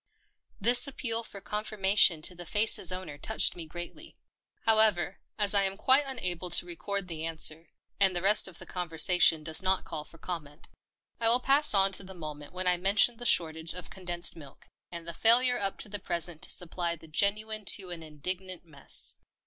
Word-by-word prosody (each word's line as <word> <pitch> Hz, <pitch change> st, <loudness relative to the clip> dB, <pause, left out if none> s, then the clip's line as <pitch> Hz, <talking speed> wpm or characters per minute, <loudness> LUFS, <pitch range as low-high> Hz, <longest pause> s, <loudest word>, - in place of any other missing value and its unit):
This 240 Hz, +5 st, +4 dB
appeal 230 Hz, -4 st, -3 dB
for 200 Hz, -, -10 dB
confirmation 200 Hz, -6 st, +1 dB
to 180 Hz, -, +3 dB
the 175 Hz, -1 st, -11 dB
face's 210 Hz, -3 st, +3 dB
owner 185 Hz, -6 st, -8 dB
touched 220 Hz, +8 st, +3 dB
me 170 Hz, -2 st, -9 dB
greatly. 175 Hz, -, -11 dB, 0.5 s
However, 215 Hz, -5 st, +3 dB, 0.2 s
as 205 Hz, -1 st, +2 dB
I 200 Hz, -, +4 dB
am 195 Hz, 0 st, -1 dB
quite 265 Hz, +6 st, +4 dB
unable 185 Hz, -9 st, -4 dB
to 175 Hz, -, +5 dB
record 195 Hz, +2 st, -5 dB
the 160 Hz, -2 st, -7 dB
answer 160 Hz, 0 st, -1 dB
— -, -, -49 dB
and 190 Hz, -2 st, +2 dB
the 175 Hz, -, -2 dB
rest 205 Hz, +1 st, +5 dB
of 180 Hz, -3 st, -12 dB
the -, -, -8 dB
conversation 170 Hz, -2 st, +3 dB
does 160 Hz, +3 st, +2 dB
not 190 Hz, 0 st, 0 dB
call 150 Hz, -, -7 dB
for 165 Hz, -, -18 dB
comment 160 Hz, -4 st, -9 dB, 0.3 s
— -, -, -42 dB
I 225 Hz, -, +4 dB
will 240 Hz, +2 st, +5 dB
pass 275 Hz, -1 st, +4 dB
on 195 Hz, 0 st, +3 dB
to 195 Hz, -, 0 dB
the 190 Hz, 0 st, -11 dB
moment 150 Hz, -3 st, -9 dB
when 185 Hz, +1 st, -5 dB
I 180 Hz, -1 st, +2 dB
mentioned 200 Hz, +6 st, +1 dB
the 240 Hz, -, -3 dB
shortage 160 Hz, -2 st, +1 dB
of 180 Hz, -2 st, -10 dB
condensed 175 Hz, -2 st, -3 dB
milk, 145 Hz, -5 st, -15 dB, 0.3 s
and 170 Hz, -1 st, -10 dB
the 170 Hz, -, -7 dB
failure 245 Hz, +6 st, +3 dB
up 195 Hz, -1 st, -3 dB
to 255 Hz, -, +5 dB
the 205 Hz, 0 st, -7 dB
present 170 Hz, -3 st, -4 dB
to -, -, -1 dB
supply 175 Hz, -1 st, -1 dB
the 160 Hz, 0 st, -17 dB
genuine 210 Hz, +6 st, -2 dB
to 185 Hz, -3 st, -10 dB
an 170 Hz, -2 st, -8 dB
indignant 180 Hz, +4 st, -7 dB
mess. 145 Hz, -4 st, -4 dB
185 Hz, 195 wpm, -28 LUFS, 165-210 Hz, 0.5 s, to